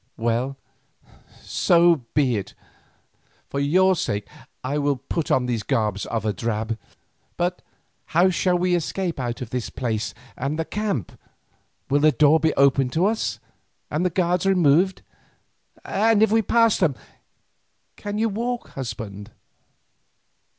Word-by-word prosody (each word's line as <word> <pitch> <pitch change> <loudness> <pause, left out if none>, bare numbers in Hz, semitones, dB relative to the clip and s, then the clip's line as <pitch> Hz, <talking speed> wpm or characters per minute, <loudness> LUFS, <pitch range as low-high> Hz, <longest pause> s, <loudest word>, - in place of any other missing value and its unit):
Well, 120 +4 -1 0.9
so 170 -6 +3
be 135 -5 +3
it, 100 - -5 1.0
for 140 - -2
your 185 +7 +3
sake 105 - -2 0.4
I 140 +3 -1
will 145 -1 +1
put 140 +5 -4
on 130 - +2
these 120 -3 -1
garments 105 -5 -1
of 110 -2 -3
a 105 - +1
drab. 110 +2 -3 0.6
But 180 +1 -1 0.4
how 180 +3 +3
shall 180 0 +1
we 180 0 +1
escape 175 0 -1
out 120 0 -3
of 120 - -10
this 125 -2 -3
place 115 -3 -3 0.2
and 140 +4 -3
the 160 - -1
camp? 205 - -2 0.8
Will 145 - +2
the 155 +1 +5
door 150 +4 +4
be 160 0 +2
opened 135 -2 +3
to 170 +3 +2
us, 220 +2 0 0.5
and 155 +4 0
the 180 - +2
guards 180 +1 0
removed, 180 0 +3 0.8
and 215 +1 +3
if 220 - +3
we 225 0 +4
pass 230 +1 +3
them, 160 -8 +2 1.0
can 205 0 -5
you 225 +1 +2
walk, 235 +3 -3
husband?" 110 -5 -6
150 Hz, 140 wpm, -23 LUFS, 125-185 Hz, 1.0 s, the